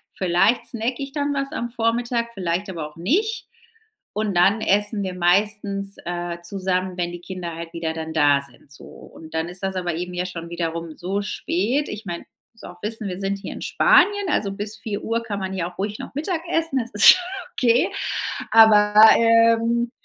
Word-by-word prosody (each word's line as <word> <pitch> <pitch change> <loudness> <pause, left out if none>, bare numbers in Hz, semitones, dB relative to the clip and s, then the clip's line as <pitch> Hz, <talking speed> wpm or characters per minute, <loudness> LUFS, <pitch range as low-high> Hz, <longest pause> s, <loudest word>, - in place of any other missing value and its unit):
Vielleicht 185 +6 +2
snacke 235 +2 -2
ich 275 0 -5
dann 290 -1 -1
was 275 0 -2
am 240 -5 -3
Vormittag, 235 0 -1
vielleicht 185 0 -2
aber 165 -5 -5
auch 150 - -22
nicht. 395 - -1 0.7
Und 210 -2 -2
dann 195 +5 +4
essen 205 +1 +1
wir 185 -1 -3
meistens, 200 +2 0
äh, 175 0 -4
zusammen, 185 0 -2
wenn 175 -1 -2
die 175 - -8
Kinder 175 -2 -6
halt 165 0 -7
wieder 165 -1 -3
dann 160 0 -6
da 145 -3 +4
sind, 135 0 -15
so. 145 - -13
Und 160 0 -13
dann 160 +1 -1
ist 180 +2 -9
das 190 0 -2
aber 175 -3 -2
eben 180 +2 -5
ja 180 0 -2
schon 170 -2 -7
wiederum 165 -1 -4
so 195 +3 -2
spät. 210 - -1
Ich 210 0 -7
meine 170 -2 -6 0.3
musst 225 - -18
du - - -7
auch 175 0 -14
wissen, 215 0 -3
wir 185 -1 -5
sind 195 0 -2
hier - - -7
in - - -9
Spanien, 410 -2 +3
also 200 - 0
bis 205 +2 -5
4:00 225 +2 -3
kann 205 -3 -4
man 190 0 -4
hier 180 -3 -2
auch 180 - -13
ruhig 205 +2 -3
noch - - -8
Mittagessen, 330 -2 -1
das 235 -1 -4
ist 210 - +7
schon 365 - +8 0.3
okay. 240 -1 +2 0.6
Aber, 210 -2 +6 0.2
ähm, 230 +1 +3
200 Hz, 195 wpm, -22 LUFS, 175-230 Hz, 0.7 s, schon